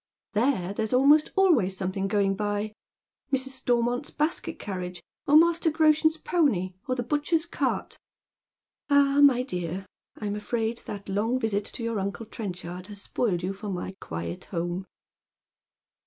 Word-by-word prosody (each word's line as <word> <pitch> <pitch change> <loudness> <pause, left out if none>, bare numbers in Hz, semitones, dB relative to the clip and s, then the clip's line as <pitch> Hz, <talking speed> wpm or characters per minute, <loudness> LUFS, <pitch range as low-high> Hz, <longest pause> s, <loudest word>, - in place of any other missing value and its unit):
There 210 -5 +1
there's 220 +2 -2
almost 285 +4 +5
always 275 - +3
something 190 +1 -2
going 200 -1 +2
by 205 +1 -2 0.3
— - - -50
Mrs. 265 -1 +1
Stormont's 245 0 0
basket 305 +3 -2
carriage, 180 -3 -5 0.3
or 295 +1 +7
Master 335 0 +4
Groshen's 315 0 +3
pony, 260 - +1
or 255 - 0
the 245 - -2
butcher's 295 +5 +1
cart." 345 - -2 0.5
" - - -66
Ah, 285 0 +5
my 260 -3 +6
dear, 180 -4 -4 0.3
I'm 205 -1 -3
afraid 225 +2 -2
that 200 -1 -6
long 215 +6 0
visit 210 -3 0
to 240 - -6
your 230 -2 -1
uncle 200 +3 -3
Tren 210 -4 -5
chard 180 +1 -8
has 205 -1 -7
spoiled 195 -3 -1
you 190 +2 -1
for 205 +2 -7
my 185 0 -4
quiet 85 +1 -5
home." 175 +1 -3
220 Hz, 155 wpm, -27 LUFS, 195-275 Hz, 0.5 s, or